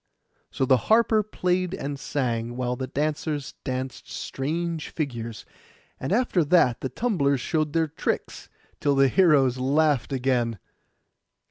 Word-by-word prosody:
So 130 - -1
the 130 0 +5
harper 220 -1 +5
played 185 -3 -1
and 140 -5 -5
sang, 120 -4 -2
while 125 -1 -1
the 130 +1 -4
dancers 150 +1 -2
danced 130 0 -4
strange 165 +3 -3
figures; 115 -7 -5 0.5
and 135 - -4
after 210 -5 +2
that 145 -6 +3
the 130 - -2
tumblers 145 - +1
showed 155 +3 -1
their 165 -1 +2
tricks, 155 - -3 0.3
till 140 -1 +2
the 135 0 +5
heroes 140 -8 +4
laughed 145 0 +2
again. 125 -4 0
140 Hz, 130 wpm, -25 LUFS, 130-165 Hz, 0.5 s, the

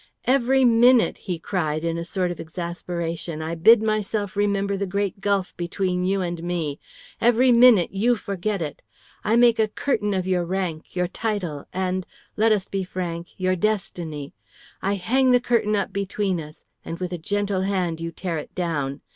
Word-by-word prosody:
"Every 265 0 +3
minute," 240 +1 +5
he 180 - 0
cried 160 -2 -2
in 165 0 0
a 170 - -3
sort 180 +1 -1
of 175 - -7
exasperation, 170 -1 -4
"I 160 +1 -3
bid 215 +7 +6
myself 215 -2 -1
remember 200 -1 +1
the 200 0 -2
great 200 +1 -2
gulf 200 -2 0
between 180 +1 -1
you 195 +1 +1
and 175 -2 -3
me; 165 -4 -3 0.4
every 245 +2 +5
minute 235 -6 +6
you 230 +5 +2
forget 200 -2 -3
it. 150 - -6 0.4
I 220 - +2
make 235 -1 +5
a 220 - +4
curtain 210 -2 -1
of 185 -1 -1
your 185 -2 +1
rank, 175 -3 -3
your 180 -1 +1
title, 185 -8 -3
and 185 0 -2 0.3
let 220 +1 +3
us 200 -3 +1
be 195 -1 -2
frank 175 -2 -4
your 185 0 +1
destiny; 175 -7 -2 0.5
I 200 +1 0
hang 255 +7 +2
the 250 0 +6
curtain 235 -3 +1
up 200 -1 -2
between 195 -2 -1
us, 150 0 -13 0.2
and 165 - -5
with 180 -1 -3
a 175 - -4
gentle 205 +2 -1
hand 185 -4 -1
you 165 0 -3
tear 170 -1 -3
it - - -10
down. 145 -6 -2
190 Hz, 180 wpm, -24 LUFS, 170-210 Hz, 0.5 s, bid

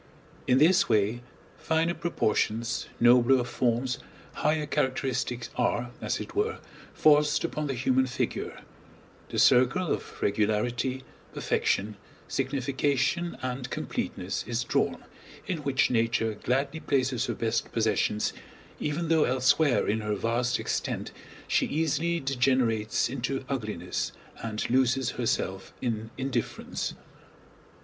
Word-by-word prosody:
In 125 - +5
this 180 +7 +5
way 110 +2 +2 0.4
finer 165 +1 +1
proportions, 115 -8 0
nobler 125 +2 +5
forms, 125 +1 0 0.3
higher 155 0 +1
characteristics 130 -3 -1
are, 120 -1 0
as - - -1
it - - -7
were, 435 +2 0 0.3
forced 150 0 +4
upon 150 -3 -2
the 135 - -2
human 130 +1 +2
figure; 125 - -3 0.7
the - - -4
circle 135 +8 +4
of - - -7
regularity, 115 +5 0 0.3
perfection, 105 +1 0 0.3
signification, 140 +5 0
and 125 0 -3
completeness 90 +1 -3
is 120 +1 -1
drawn, - - 0 0.4
in 175 -3 -2
which 140 -3 +1
Nature 115 -1 +1
gladly 135 +8 -1
places 130 -4 0
her - - -2
best 115 0 -1
possessions 105 -1 +1 0.5
even 155 +3 -2
though 160 -1 +4
elsewhere 130 +3 +3
in 110 +2 +1
her 105 -1 -1
vast 120 +3 0
extent - - -2 0.4
she - - +2
easily 160 +2 0
degenerates 125 -5 +1
into 135 +1 -3
ugliness 105 -9 -3 0.3
and 110 -1 -3
loses 130 0 +2
herself 95 -5 -2
in 110 -2 -2
indifference. 130 -3 -3
125 Hz, 115 wpm, -28 LUFS, 115-140 Hz, 0.7 s, In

